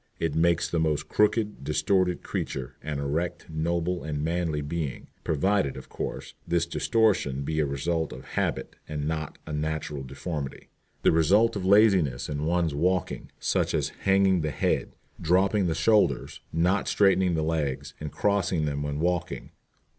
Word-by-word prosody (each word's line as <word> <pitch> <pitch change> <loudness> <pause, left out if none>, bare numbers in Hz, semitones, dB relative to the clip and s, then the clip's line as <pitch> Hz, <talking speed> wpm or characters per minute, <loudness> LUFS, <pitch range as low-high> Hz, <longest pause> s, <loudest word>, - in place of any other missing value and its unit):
It 80 -3 -1
makes 85 +1 +2
the 85 - -1
most 75 -1 0
crooked, 105 0 +1
distorted 90 +4 +1
creature 65 -1 -4
an 75 -1 -4
erect, 80 +5 -2
noble, 85 +3 -1
and 75 -1 -3
manly 80 -2 -1
being, 75 -3 -4
provided, 80 -1 +1
of - - -10
course, - - -5
this 85 -1 +1
distortion 90 - +1
be 80 +2 -2
a 75 - +2
result 80 +3 -1
of - - -9
habit - - -2
and 75 -1 -3
not 80 -2 -3
a 80 - -6
natural 75 -1 -2
deformity, 70 +2 -6 0.3
the - - +5
result 95 +9 +4
of 95 -2 -3
laziness 95 - +4
in 75 +1 -2
one's 85 -2 +1
walking, 90 +4 -1
such - - 0
as - - 0
hanging 95 -2 +2
the 75 - -1
head, 75 - -1 0.3
dropping 95 +3 +3
the 80 - 0
shoulders, 105 +6 +2
not 90 +5 +1
straightening 95 -3 +3
the 80 - 0
legs, 75 -4 -2
and 75 -1 -5
crossing 95 -2 +1
them 70 -1 -2
when 75 0 -3
walking. 90 +1 -2
80 Hz, 155 wpm, -27 LUFS, 75-90 Hz, 0.3 s, the